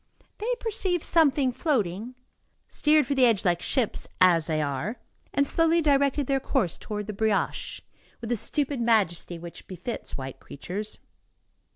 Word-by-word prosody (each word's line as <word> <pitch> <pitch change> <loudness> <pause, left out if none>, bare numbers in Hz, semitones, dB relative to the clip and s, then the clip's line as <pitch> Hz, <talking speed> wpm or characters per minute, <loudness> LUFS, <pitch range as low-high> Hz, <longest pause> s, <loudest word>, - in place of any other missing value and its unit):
They 445 +4 -1
perceived 380 -6 -1
something 285 -5 +3
floating, 240 - -1 0.5
steered 300 0 +3
for 285 - -1
the 260 -2 +5
edge 220 -5 +1
like 175 -1 +2
ships, 255 -6 -1
as 170 -4 +5
they 155 -2 0
are, 145 - -2 0.3
and 280 - +2
slowly 330 +3 +4
directed 280 -2 +2
their 270 +1 +1
course 255 - -1
toward 210 -1 -5
the 215 - -5
brioche, 215 0 -1 0.4
with 235 0 -5
the - - +3
stupid 280 +3 -1
majesty 200 -7 +1
which 170 0 -10
befits 185 +6 -5
white 135 -1 -7
creatures. 200 +9 -6
235 Hz, 150 wpm, -26 LUFS, 185-285 Hz, 0.5 s, the